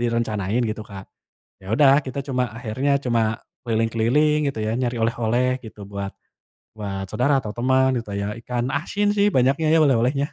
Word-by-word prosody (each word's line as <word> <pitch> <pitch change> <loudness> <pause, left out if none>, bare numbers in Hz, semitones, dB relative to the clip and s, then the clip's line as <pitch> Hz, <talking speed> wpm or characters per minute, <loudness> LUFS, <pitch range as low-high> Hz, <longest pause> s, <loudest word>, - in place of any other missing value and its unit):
direncanain 115 -2 0
gitu, 110 0 -5
Kak. 95 -1 -8 0.6
Ya 95 - -15
udah, 135 +2 +6
kita 130 +1 -5
cuma 125 -1 0
akhirnya 120 +5 -2
cuma 120 -2 +2 0.4
keliling-keliling 115 +6 +2
gitu 135 - -5
ya, - - 0
nyari 120 -1 -1
oleh-oleh 120 +2 +1 0.2
gitu 110 -1 -11
buat 100 0 -4 0.6
buat 100 -2 -4
saudara 140 +4 +2
atau 105 -4 -6
teman 130 +2 +3
gitu 115 -3 -7
ya, 100 - -2
ikan 120 +1 -2
asin 205 +7 -1
sih 200 - +4
banyaknya 135 +5 +2
ya - - +5
oleh-olehnya. 135 +1 +2
120 Hz, 165 wpm, -23 LUFS, 110-130 Hz, 0.6 s, udah